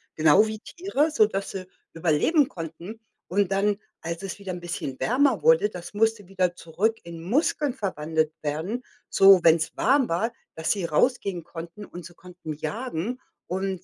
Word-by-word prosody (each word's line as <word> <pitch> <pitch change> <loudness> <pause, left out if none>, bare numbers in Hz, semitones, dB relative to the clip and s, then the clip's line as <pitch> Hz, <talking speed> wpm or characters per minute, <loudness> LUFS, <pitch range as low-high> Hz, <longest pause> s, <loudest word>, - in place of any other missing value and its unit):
genau 155 +7 +5
wie 215 -1 -5
Tiere, 325 - -1
sodass 210 -7 +1
sie 185 -1 -6 0.3
überleben 175 - +3
konnten. 170 +5 -8 0.3
Und 195 +1 +1
dann, 200 +1 +2 0.2
als 170 +2 -4
es 195 +1 -5
wieder 200 -2 -6
'n 175 - -6
bisschen 170 -6 -5
wärmer 265 +4 +2
wurde, 480 - +5
das 175 -1 -9
musste 220 -2 +1
wieder 185 -2 0
zurück 200 +7 -1
in 170 -1 -9
Muskeln 280 - +1
verwandelt 160 - -1
werden, 165 +12 -3 0.3
so 195 -1 +7
wenn's 160 -1 +4
warm 270 0 +3
war, 215 +8 0 0.2
dass 160 0 -1
sie 195 -4 0
rausgehen 185 - +1
konnten 170 +5 -9
und 175 -3 -10
sie 175 - -11
konnten 180 -3 -9
jagen 225 - -4 0.3
und 190 0 -3
190 Hz, 160 wpm, -25 LUFS, 170-225 Hz, 0.3 s, so